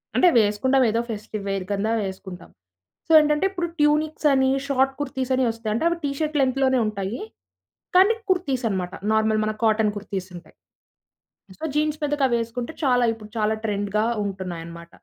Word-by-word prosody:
అంటే 365 Hz, -, +5 dB
వేసుకుంటాం 240 Hz, +6 st, +2 dB
ఏదో 230 Hz, +2 st, +1 dB
ఫెస్టివ్ 210 Hz, -1 st, -5 dB
వేర్ 195 Hz, -1 st, -2 dB
కింద 200 Hz, +2 st, 0 dB, 0.2 s
వేసుకుంటాం. 190 Hz, -1 st, -8 dB, 0.6 s
సో -, -, -3 dB
ఏంటంటే, 300 Hz, +3 st, +2 dB
ఇప్పుడు 350 Hz, -3 st, -2 dB
ట్యూనిక్స్ 300 Hz, +1 st, +2 dB
అని 265 Hz, -1 st, +3 dB, 0.2 s
షార్ట్ 270 Hz, -1 st, +2 dB
కుర్తీస్ 265 Hz, -2 st, -3 dB
అని 260 Hz, -, +1 dB
వస్తాయి. 225 Hz, -1 st, -4 dB
అంటే 275 Hz, -, -1 dB
అవి 340 Hz, -, -1 dB
టీ 280 Hz, -, 0 dB
షర్ట్ 310 Hz, -1 st, -1 dB
లెంగ్త్‌లోనే 260 Hz, 0 st, +2 dB
ఉంటాయి. 200 Hz, +2 st, -4 dB, 0.8 s
కానీ 390 Hz, +4 st, +6 dB, 0.2 s
కుర్తీస్ 275 Hz, -9 st, 0 dB
అనమాట. 185 Hz, -2 st, -3 dB, 0.2 s
నార్మల్ 220 Hz, 0 st, +2 dB
మన 215 Hz, -, -1 dB
కాటన్ 215 Hz, -1 st, +3 dB
కుర్తీస్ 195 Hz, -2 st, -5 dB
ఉంటాయి. 175 Hz, -, -16 dB, 1.0 s
సో, -, -, -11 dB
జీన్స్ 305 Hz, 0 st, +1 dB
మీదకి 295 Hz, -1 st, 0 dB
అవేసుకుంటే 235 Hz, +3 st, -2 dB
చాలా 245 Hz, -2 st, +3 dB
ఇపుడు 215 Hz, -1 st, -13 dB
చాలా 215 Hz, +1 st, +1 dB
ట్రెండ్‌గా 205 Hz, +1 st, 0 dB, 0.2 s
ఉంటున్నాయన్నమాట. 170 Hz, -3 st, -7 dB
230 Hz, 155 wpm, -23 LUFS, 205-275 Hz, 1.0 s, కానీ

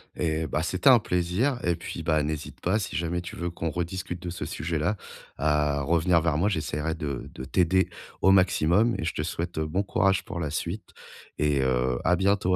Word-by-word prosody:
Et 80 Hz, -1 st, -1 dB
bah! 75 Hz, -, -1 dB
c'était 95 Hz, +9 st, +3 dB
un 125 Hz, -3 st, +8 dB
plaisir. 100 Hz, +8 st, 0 dB
Et 85 Hz, -1 st, +2 dB
puis, 85 Hz, 0 st, -6 dB
bah, 80 Hz, -2 st, +2 dB
n'hésite 75 Hz, 0 st, -5 dB
pas, 95 Hz, +5 st, +1 dB
si 100 Hz, -, -4 dB
jamais 85 Hz, +1 st, -1 dB
tu 90 Hz, +5 st, -8 dB
veux 85 Hz, -3 st, -3 dB
qu'on 85 Hz, -1 st, -3 dB
rediscute 90 Hz, +2 st, -4 dB
de 90 Hz, -, -5 dB
ce 85 Hz, -1 st, -5 dB
sujet-là, 80 Hz, +6 st, -1 dB, 0.4 s
à 75 Hz, 0 st, +1 dB
revenir 85 Hz, +3 st, +3 dB
vers 80 Hz, -2 st, +1 dB
moi. 100 Hz, +6 st, +2 dB
J'essaierai 80 Hz, -2 st, -2 dB
de 70 Hz, -5 st, -4 dB
de -, -, -7 dB
t'aider 95 Hz, +4 st, +2 dB, 0.3 s
au 95 Hz, -, +6 dB
maximum 95 Hz, +3 st, +4 dB
et -, -, -4 dB
je 85 Hz, -, -1 dB
te -, -, -2 dB
souhaite, 85 Hz, +1 st, -4 dB
heu, 80 Hz, -, 0 dB
bon 95 Hz, +6 st, 0 dB
courage 95 Hz, -1 st, +2 dB
pour 85 Hz, -, -5 dB
la 75 Hz, -3 st, -2 dB
suite 85 Hz, +6 st, -4 dB, 0.5 s
et, 75 Hz, -2 st, +2 dB
heu, 65 Hz, -1 st, +1 dB
à 90 Hz, -, +4 dB
bientôt 95 Hz, 0 st, +2 dB
85 Hz, 205 wpm, -27 LUFS, 75-95 Hz, 0.5 s, un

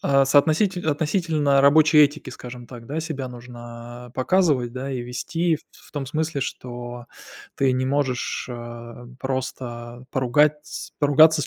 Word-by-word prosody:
а 135 Hz, -1 st, +4 dB
соотноситель 160 Hz, +6 st, +3 dB
относительно 150 Hz, -2 st, +2 dB
рабочей 155 Hz, +2 st, +6 dB
этики, 145 Hz, -2 st, +4 dB
скажем 125 Hz, -1 st, -9 dB
так, 120 Hz, -2 st, -10 dB
да, 155 Hz, +3 st, -2 dB
себя 145 Hz, -5 st, -4 dB
нужно 120 Hz, 0 st, -10 dB
показывать, 135 Hz, -5 st, +2 dB
да. 130 Hz, +2 st, -4 dB
И 125 Hz, -, -2 dB
вести 160 Hz, +8 st, -1 dB
в -, -, -18 dB, 0.3 s
в -, -, -20 dB
том 145 Hz, -3 st, -3 dB
смысле, 155 Hz, +1 st, -1 dB
что 120 Hz, -2 st, -6 dB, 0.5 s
ты 135 Hz, -1 st, +3 dB
не 130 Hz, +1 st, 0 dB
можешь, 135 Hz, -2 st, -1 dB
э, 120 Hz, 0 st, -8 dB
просто 125 Hz, -2 st, -4 dB
поругатьс 145 Hz, +4 st, +1 dB
поругаться 155 Hz, +2 st, +6 dB
с -, -, -3 dB
135 Hz, 140 wpm, -24 LUFS, 120-150 Hz, 0.5 s, рабочей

